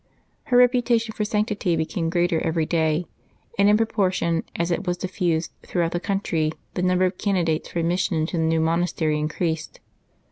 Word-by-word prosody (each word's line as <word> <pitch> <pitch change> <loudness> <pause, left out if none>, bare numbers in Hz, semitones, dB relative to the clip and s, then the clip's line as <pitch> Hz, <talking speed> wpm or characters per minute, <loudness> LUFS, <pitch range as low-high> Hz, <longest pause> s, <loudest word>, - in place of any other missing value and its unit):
Her 250 -4 +3
reputation 240 -2 +3
for 210 - -2
sanctity 210 -4 0
became 165 +1 -1
greater 175 -1 +1
every 160 -1 0
day; 160 0 +1 0.5
and 200 +1 +6
in 210 - +5
proportion 185 -7 0
as 170 +1 -1
it 175 +2 -2
was 175 0 0
diffused 175 -3 -1
throughout 170 -2 -1
the 175 - -1
country 170 -5 -1 0.2
the 180 - -2
number 180 0 +3
of 180 0 -2
candidates 175 -6 0
for - - -6
admission 170 +1 0
into 160 +3 -1
the 160 - +1
new 160 0 +2
monastery 160 -2 0
increased. 160 +1 -2
175 Hz, 170 wpm, -23 LUFS, 165-200 Hz, 0.5 s, and